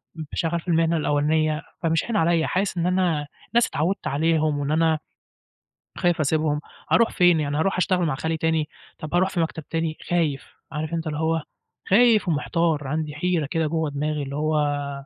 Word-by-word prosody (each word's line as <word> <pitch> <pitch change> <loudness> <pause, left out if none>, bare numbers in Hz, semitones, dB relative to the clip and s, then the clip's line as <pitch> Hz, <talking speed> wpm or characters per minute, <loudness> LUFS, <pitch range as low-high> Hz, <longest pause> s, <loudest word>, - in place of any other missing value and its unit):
م 160 - -5
شغّال 170 -1 0
في - - -24
المهنة 165 0 +2
الأولانية، 155 +1 +1 0.2
فمش 165 -1 +1
هاين 235 - -3
عليّا، 165 -2 +2
حاسِس 190 0 -1
إن 170 - 0
أنا 175 -5 +1 0.3
ناس 235 0 +4
اتعوِّدت 175 +7 -1
عليهم 155 0 +1
وإن 145 +1 -2
أنا 160 -1 +2 1.0
خايف 175 -2 +1
أسيبهم، 155 0 +1 0.3
أروح 230 -1 +4
فين؟ 175 -2 +4
يعني 145 -1 -1
أروح 190 +4 +1
أشتغل 180 -1 +1
مع 150 - 0
خالي 160 +4 -2
تاني، 160 -1 0 0.3
طَب 155 - -7
أروح 185 +2 +3
في 180 - -3
مكتب 160 -1 -2
تاني؟ 165 -1 -2
خايف، 160 -6 -1 0.2
عارف 155 +2 -4
أنت 165 -1 -2
اللي 150 0 -3
هو 160 0 +1 0.5
خايف 220 0 +5
ومحتار، 155 -1 0
عندي 150 0 -3
حيرة 170 -1 0
كده 160 +1 -1
جوّه 160 -1 -1
دماغي 150 +1 -2
اللي 140 +1 -6
هو 150 -2 0
160 Hz, 180 wpm, -24 LUFS, 150-170 Hz, 1.0 s, خايف